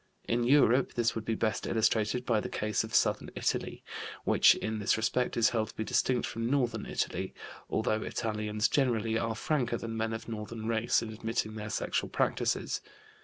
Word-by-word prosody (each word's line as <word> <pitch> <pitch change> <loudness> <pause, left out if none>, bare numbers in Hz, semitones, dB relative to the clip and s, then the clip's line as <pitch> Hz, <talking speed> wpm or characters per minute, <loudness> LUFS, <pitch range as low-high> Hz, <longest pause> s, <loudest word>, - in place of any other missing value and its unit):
In 120 +1 +1
Europe 130 -1 +4
this 115 -1 +2
would 110 -1 -5
be 115 - 0
best 110 0 -1
illustrated 110 +2 +1
by 115 -3 +2
the - - -4
case 105 0 0
of 110 0 -4
southern - - +2
Italy, - - -2 0.4
which - - +6
in 110 0 -3
this 105 - +2
respect 115 +3 0
is 115 -1 +5
held 110 -2 -1
to - - -12
be 110 - -2
distinct 125 +3 +1
from 115 +1 -3
northern 120 -6 0
Italy, - - -2 0.3
although 110 0 0
Italians 105 -1 -1
generally 115 -5 +1
are 115 -1 -1
franker 120 -2 0
than 115 0 -5
men 110 0 -1
of 110 - -6
northern 110 0 -5
race 115 0 +2
in 110 -1 -6
admitting 110 -1 -2
their 105 -1 -6
sexual - - -1
practices. - - 0
115 Hz, 180 wpm, -30 LUFS, 110-120 Hz, 0.4 s, which